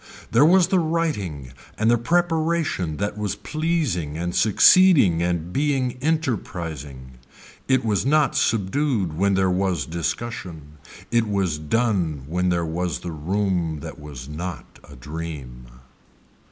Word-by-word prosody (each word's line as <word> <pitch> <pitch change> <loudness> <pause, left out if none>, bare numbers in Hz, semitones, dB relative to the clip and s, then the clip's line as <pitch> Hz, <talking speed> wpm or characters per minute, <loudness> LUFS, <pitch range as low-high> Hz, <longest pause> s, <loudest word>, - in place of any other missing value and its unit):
There 115 +5 +5
was 180 +1 +5
the 190 - +3
writing 130 - -2 0.3
and 110 +2 +3
the - - +5
preparation 160 - 0
that 105 +1 -3
was 105 -3 -2
pleasing 150 - -2
and 85 +1 -3
succeeding 110 - +5
and 85 0 -2
being 135 -4 0
enterprising. 80 - -3 0.5
It 130 -2 +2
was 105 -3 +1
not 145 +1 +2
subdued 110 - 0
when 100 +3 +2
there 95 -1 +2
was 90 -2 0
discussion, 80 -3 -5 0.3
it 115 -1 +2
was 95 -7 -1
done 85 - 0
where 85 +5 -3
there 90 -2 +1
was 85 +2 -3
the 90 - -5
room 85 -1 -1
that - - -8
was 70 -4 -9
not 85 +4 -7
a - - -14
dream. 70 -3 -7
95 Hz, 130 wpm, -23 LUFS, 80-130 Hz, 0.5 s, There